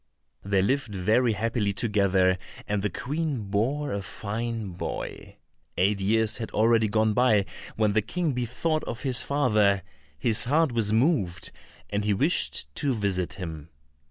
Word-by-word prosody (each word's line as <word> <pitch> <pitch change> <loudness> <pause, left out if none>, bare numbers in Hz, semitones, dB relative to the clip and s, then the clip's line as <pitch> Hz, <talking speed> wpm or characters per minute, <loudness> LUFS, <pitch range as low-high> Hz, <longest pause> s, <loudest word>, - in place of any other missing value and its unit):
They 100 -1 +2
lived 125 -2 0
very 110 +6 +2
happily 110 -1 0
together, 95 -4 +2 0.3
and 105 -1 0
the 105 - 0
Queen 145 - -3
bore 135 +8 0
a 100 - -2
fine 110 +2 -4
boy. 90 0 -6 0.4
Eight 100 +3 +2
years 110 +2 +2
had 110 - -4
already 110 0 +3
gone 110 +1 +2
by, 110 -4 +3 0.3
when 105 -2 +2
the 110 - +3
King 165 - -1
bethought 125 +6 -1
him - - -7
of 120 - -5
his 130 -3 +1
father; 105 -9 +2 0.3
his 110 +9 +1
heart 155 +3 +3
was 115 -3 +1
moved, 110 - +1 0.4
and 105 0 0
he 105 -1 +1
wished 70 -6 +1
to 135 -3 0
visit 95 -4 -1
him. 80 -5 -7
110 Hz, 155 wpm, -26 LUFS, 100-125 Hz, 0.4 s, already